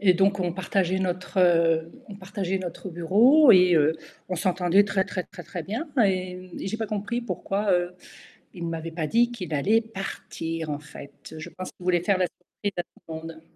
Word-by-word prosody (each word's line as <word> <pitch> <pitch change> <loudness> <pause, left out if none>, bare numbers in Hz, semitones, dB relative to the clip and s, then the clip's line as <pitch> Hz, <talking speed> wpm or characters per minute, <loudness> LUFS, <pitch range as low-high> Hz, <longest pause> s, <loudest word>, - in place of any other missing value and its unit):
Et 185 -3 +5
donc 195 +2 +3
on 175 -2 -1
partageait 190 0 0
notre 185 +1 -2
heu, 165 -2 +3 0.2
on 205 - -8
partageait 190 -1 -3
notre 180 +1 -6
bureau 220 - +5
et 180 -2 +7
heu, 155 0 +3 0.3
on 185 - -2
s'entendait 185 +2 +3
très, 190 -1 0
très, 185 -3 -4
très, 175 - -11
très 175 +1 -6
bien 230 - -4 0.2
et 185 -2 0
mmh, 185 -1 -10
et - - -3
j'ai 220 - -2
pas 225 - -3
compris 215 +3 -2
pourquoi, 205 -3 -1
heu, 175 0 +1 0.6
il 170 -2 -5
m'avait 165 0 -4
pas 160 -2 -2
dit 240 +1 +3
qu'il 180 -9 -6
allait 215 +11 +3
partir 165 -6 -5
en 145 0 -2
fait. 145 -1 -12
Je 155 - -7
pense 185 - -7
qu'il - - -16
voulait 175 -1 +2
faire 195 0 +2
la 180 - +2
surprise 200 +3 -7
à 175 - 0
tout - - -52 0.2
le 160 - -6
monde. 160 0 -8
185 Hz, 210 wpm, -26 LUFS, 170-200 Hz, 0.6 s, et